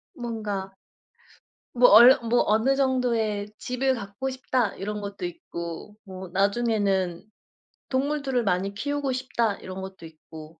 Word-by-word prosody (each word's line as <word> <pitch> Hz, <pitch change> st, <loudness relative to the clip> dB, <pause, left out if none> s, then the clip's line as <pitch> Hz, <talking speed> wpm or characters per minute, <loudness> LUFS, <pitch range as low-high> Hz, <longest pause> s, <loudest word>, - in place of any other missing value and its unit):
뭔가 210 Hz, -5 st, -4 dB, 1.0 s
뭐 245 Hz, 0 st, +6 dB
얼르 240 Hz, +5 st, +9 dB
뭐 240 Hz, +1 st, +3 dB
'어느 220 Hz, +6 st, +3 dB
정도의 235 Hz, -6 st, 0 dB
집을 260 Hz, +1 st, -1 dB
갖고 205 Hz, +4 st, -5 dB
싶다.' 255 Hz, -4 st, -1 dB
이런 210 Hz, +1 st, -4 dB
것도 200 Hz, -2 st, -5 dB
있고 170 Hz, +2 st, -7 dB
뭐 190 Hz, -2 st, -9 dB
'나중에는 200 Hz, -3 st, 0 dB, 0.7 s
동물들을 270 Hz, -2 st, 0 dB
많이 195 Hz, 0 st, 0 dB
키우고 285 Hz, +5 st, -2 dB
싶다.' 235 Hz, -4 st, -1 dB
이런 185 Hz, 0 st, -8 dB
것도 190 Hz, -3 st, -9 dB
있고 160 Hz, 0 st, -13 dB
210 Hz, 255 characters per minute, -25 LUFS, 190-250 Hz, 1.0 s, 얼르